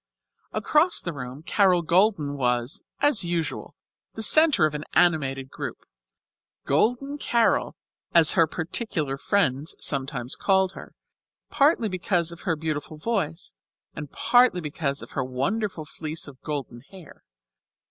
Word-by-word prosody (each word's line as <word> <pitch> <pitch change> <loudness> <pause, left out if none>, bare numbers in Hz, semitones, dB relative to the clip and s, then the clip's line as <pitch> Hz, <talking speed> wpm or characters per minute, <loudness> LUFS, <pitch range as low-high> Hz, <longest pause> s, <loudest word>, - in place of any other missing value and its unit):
Across 300 - +2
the 170 - -4
room 130 +1 -8
Carol 185 -2 +3
Golden 170 -4 +2
was, 125 -1 0 0.2
as 290 -8 +3
usual, 170 -3 -3 0.4
the 220 - -4
centre 310 - +5
of 155 - -1
an 150 0 -4
animated 135 -6 +2
group; - - -7 0.8
Golden 245 - 0
Carol 235 -4 +1 0.4
as 165 -3 +6
her 165 - +4
particular 160 - -3
friends 150 -7 0
sometimes 135 -3 -2
called 190 -1 +2
her, - - -12 0.6
partly 280 -5 +3
because 180 -3 -1
of 170 - -11
her 165 - +2
beautiful 155 -1 -4
voice, 170 -3 -3 0.4
and 150 -1 -8
partly 245 -6 +3
because 145 -3 -3
of - - -12
her 135 - -2
wonderful 155 - -2
fleece 155 +2 -5
of 135 -2 -13
golden 140 -6 -5
hair. 185 -6 -15
165 Hz, 130 wpm, -25 LUFS, 145-200 Hz, 0.8 s, as